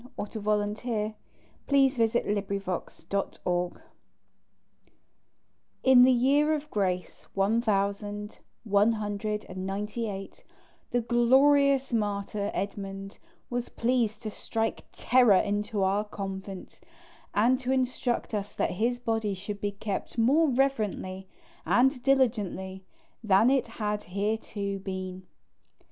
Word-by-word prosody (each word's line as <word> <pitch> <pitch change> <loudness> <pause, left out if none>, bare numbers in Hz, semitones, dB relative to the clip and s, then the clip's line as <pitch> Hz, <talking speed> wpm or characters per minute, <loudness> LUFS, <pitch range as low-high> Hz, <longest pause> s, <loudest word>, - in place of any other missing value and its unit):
CHAPTER 210 +1 -5
XIV 210 +1 -1 0.5
the - - -24
shrine 280 -1 +6 0.2
of 225 - +4 0.8
st. 195 +4 -4
edmund 175 0 -1 2.0
IN 260 -1 +7
the 260 - +6
year 285 +5 +3
of 300 0 -7
grace 185 -3 -2
one 200 +4 +2
thousand 205 -1 -2 0.2
one 210 +1 +3
hundred 210 0 -3
and 185 0 -6
ninety 210 +3 -3
eight, 195 -1 -8 0.5
the 245 - +1
glorious 265 +3 +4
martyr 205 -1 -1
Edmund 195 0 -5 0.3
was 245 0 -2
pleased 235 -2 0
to 215 - -4
strike 225 +2 -3
terror 245 -5 +4
into 205 +1 0
our 195 +2 +2
convent, 195 -2 -7 0.6
and 240 +5 +4
to 260 -1 -2
instruct 255 -2 -1
us 205 -1 -3
that - - 0
his 235 +6 0
body 225 -4 -1
should 200 +2 -6
be 205 0 -1
kept 200 +3 -5
more 285 +8 +4
reverently 215 -8 -1 0.4
and 260 +1 +3
diligently 210 -8 0 0.4
than 215 +4 +5
it 270 -1 +2
had 210 -1 -3
hitherto 200 0 -3
been. 185 -1 -6
210 Hz, 115 wpm, -28 LUFS, 200-245 Hz, 2.0 s, IN